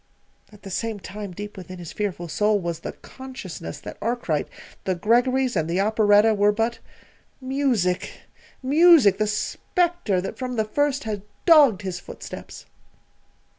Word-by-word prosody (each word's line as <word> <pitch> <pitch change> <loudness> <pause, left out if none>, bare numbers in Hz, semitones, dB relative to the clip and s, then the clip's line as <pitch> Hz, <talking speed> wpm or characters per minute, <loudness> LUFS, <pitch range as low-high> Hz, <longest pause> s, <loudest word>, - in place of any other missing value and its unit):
At 210 -1 -17
the 195 - -8
same 225 +2 -3
time, 205 0 -7
deep 205 +3 -8
within 185 0 -9
his 175 -3 -8
fearful 185 -4 -3
soul 210 +5 +2
was 170 -3 -4
the - - -6
consciousness 255 -11 -9
that - - -9
Arkwright, 225 -10 -1 0.4
the 185 - 0
Greggorys, 245 +6 +2
and 160 -2 0
the 175 +3 0
operetta 215 +1 +4
were 205 0 +3
but 225 +2 -1 0.6
Music 260 -9 0 0.5
Music, 295 - +6
the 215 - +2
spectre 345 - 0
that 185 - -5
from 255 -1 -3
the 220 -2 +1
first 290 +5 0
had 215 -3 -4 0.2
dogged 285 - +6
his 185 -2 -4
footsteps. - - -10
215 Hz, 145 wpm, -24 LUFS, 190-255 Hz, 0.6 s, Music